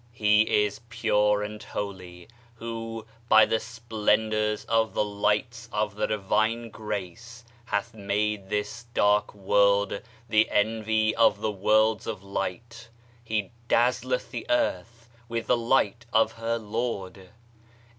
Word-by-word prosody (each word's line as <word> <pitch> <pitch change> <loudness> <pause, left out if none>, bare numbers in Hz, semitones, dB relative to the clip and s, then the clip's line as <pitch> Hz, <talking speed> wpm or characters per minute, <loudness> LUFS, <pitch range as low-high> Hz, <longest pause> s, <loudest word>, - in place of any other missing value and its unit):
He 105 -1 +3
is 105 +1 -6
pure 105 -2 +2
and 105 +1 -6
holy, 90 -3 -7 0.3
who, 115 -1 -6 0.2
by 110 0 +8
the 110 - 0
splendors 110 -2 0
of 115 -1 +1
the 105 - +2
lights 105 +3 -1
of 105 -1 -1
the 105 - -1
divine 110 +3 0
grace 110 +3 -6 0.2
hath 110 +2 -2
made 105 -1 -2
this 105 +2 -3
dark 105 0 +3
world 100 0 +2 0.3
the 110 -1 +3
envy 110 +1 +1
of 115 - +4
the 110 - 0
worlds 110 +2 +2
of 105 -4 -5
light: 115 +5 -5 0.3
"He 110 -3 -2 0.2
dazzleth 125 - +1
the - - -6
earth 120 - -1 0.2
with 115 0 -2
the 125 - +3
light 115 -1 +1
of 110 - +3
her 115 +1 -2
Lord." 105 -4 -4
110 Hz, 125 wpm, -26 LUFS, 105-115 Hz, 0.3 s, by